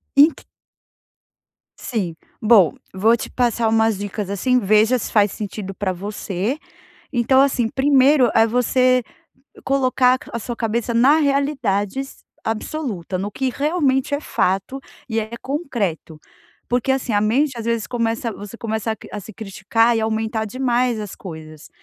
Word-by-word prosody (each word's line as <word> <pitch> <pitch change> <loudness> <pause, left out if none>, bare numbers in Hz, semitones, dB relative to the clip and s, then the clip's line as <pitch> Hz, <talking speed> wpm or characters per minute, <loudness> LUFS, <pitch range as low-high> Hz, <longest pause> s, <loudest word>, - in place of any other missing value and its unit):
Ent 290 +4 +5 1.3
Sim, 195 -9 -3 0.3
bom, 210 -7 +5 0.2
vou 220 +5 +3
te - - -6
passar 235 -2 +1
umas 220 -1 +2
dicas 205 0 -4
assim, 250 +6 +1
veja 215 +4 +3
se - - -5
faz 205 -2 +3
sentido 200 -2 -6
pra 190 0 -2
você. 200 +4 -3 0.6
Então, 260 +2 +3
assim, 260 -4 +2
primeiro 270 -1 +4
é 225 - +5
você 255 +2 +2 0.6
colocar 255 -1 +3
a 235 - -2
sua 235 +1 -5
cabeça 235 +1 -1
na 270 +7 +5
realidades 270 -5 -1 0.2
absoluta, 220 - -3
no 200 +2 -3
que 265 +4 -2
realmente 285 -2 0
é 285 - -1
fato 195 +1 -1 0.3
e 225 -1 0
é 220 0 -6
concreto. 220 - -3 0.5
Porque, 245 +2 +1
assim, 260 -3 -2
a 205 - +3
mente 250 +5 +1
às 230 - -5
vezes 230 -2 -1
começa 230 -1 -2
você 205 +2 -9
começa 220 -1 -2
a - - -7
cri - - -13
a 210 - -4
se 210 +3 -11
criticar 225 +3 +1
e - - 0
aumentar 220 0 -1
demais 245 0 0
as 210 -3 -6
coisas, 155 -4 -10
230 Hz, 150 wpm, -21 LUFS, 205-260 Hz, 1.3 s, Ent